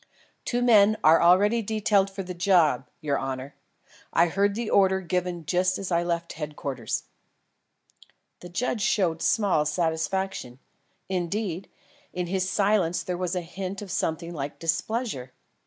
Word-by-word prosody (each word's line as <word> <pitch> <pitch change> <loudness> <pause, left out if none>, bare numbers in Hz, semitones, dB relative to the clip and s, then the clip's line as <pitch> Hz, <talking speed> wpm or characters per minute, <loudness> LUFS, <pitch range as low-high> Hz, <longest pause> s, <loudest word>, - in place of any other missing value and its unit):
"Two 245 0 0
men 215 -3 +5
are 160 +1 +6
already 205 +7 +5
detailed 205 -2 +1
for 195 0 -6
the 180 0 -6
job, 170 -8 +2
your 145 -3 0
honour. 135 +1 -5 0.6
I 170 +1 +3
heard 200 +3 +1
the 235 0 -3
order 190 -2 +3
given 180 -2 -2
just 185 +3 +1
as 195 -2 -5
I 170 0 +3
left 170 -1 -2
Headquarters." 145 -6 -4 1.4
The 175 - -10
judge 220 +5 -2
showed 180 -6 +1
small 200 -9 +2
satisfaction. 160 -3 -2 0.5
Indeed, 185 0 -2 0.4
in 180 0 -2
his 185 +1 -1
silence 195 -3 +1
there 180 - -3
was 180 0 -2
the 180 - -1
hint 190 +3 -6
of 195 - -8
something 170 -1 -2
like 145 -2 -5
displeasure. 165 - -2
180 Hz, 140 wpm, -26 LUFS, 165-200 Hz, 1.4 s, are